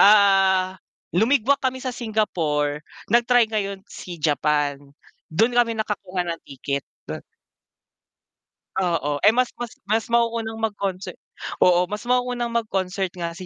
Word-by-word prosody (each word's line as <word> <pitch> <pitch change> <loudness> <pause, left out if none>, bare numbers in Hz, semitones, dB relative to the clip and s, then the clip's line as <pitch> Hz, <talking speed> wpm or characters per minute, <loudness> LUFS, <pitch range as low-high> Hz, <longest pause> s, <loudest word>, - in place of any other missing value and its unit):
ah, 195 -2 +5 0.3
lumigwak 250 +7 +3
kami 260 -1 0
sa 255 - -2
Singapore, 165 -11 -1 0.3
nag-try 240 0 +5
ngayon 200 -2 -2
si 180 -3 -9
Japan, 150 -2 +1 0.5
dun 220 +10 +2
kami 235 -2 +2
nakakuha 195 -4 -2
ng 170 -1 -4
ticket. 140 +1 -3 0.2
Dun - - -7 1.6
Oo. 150 -5 0
Eh, 205 - +7
mas 250 0 +1
mas 240 -2 -4
mas 215 +2 +1
mauunang 230 -1 +1
mag-concert 200 -4 -3 0.4
oo 180 0 +5
mas 210 +3 -5
mauunang 250 -1 +1
mag-concert 195 -5 -1
nga 170 -2 -3
si 185 - -8
200 Hz, 125 wpm, -23 LUFS, 175-230 Hz, 1.6 s, Eh